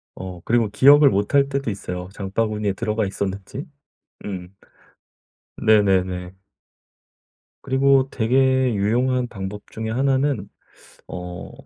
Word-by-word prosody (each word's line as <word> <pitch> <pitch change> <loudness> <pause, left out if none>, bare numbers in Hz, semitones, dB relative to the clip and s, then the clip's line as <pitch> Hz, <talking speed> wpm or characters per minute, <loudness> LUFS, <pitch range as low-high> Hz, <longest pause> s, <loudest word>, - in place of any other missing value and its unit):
어 90 -2 -8
그리고 115 -2 +2
기억을 140 +6 +6
못 100 +2 -1
할 140 -1 +4
때도 140 -4 -2
있어요, 90 -2 -6
장바구니에 105 +1 -2
들어가 110 +1 -1
있었는지? 100 +7 -5 0.6
음. 95 -2 -6 1.0
네네네. 95 -4 +2 1.3
그리고 135 0 +3
되게 130 +1 +2
유용한 125 +5 +1
방법 105 -2 -7
중에 110 0 -5
1 135 +3 +1
는 130 -8 -1 0.6
어 90 -1 -7
110 Hz, 225 characters per minute, -22 LUFS, 95-130 Hz, 1.3 s, 기억을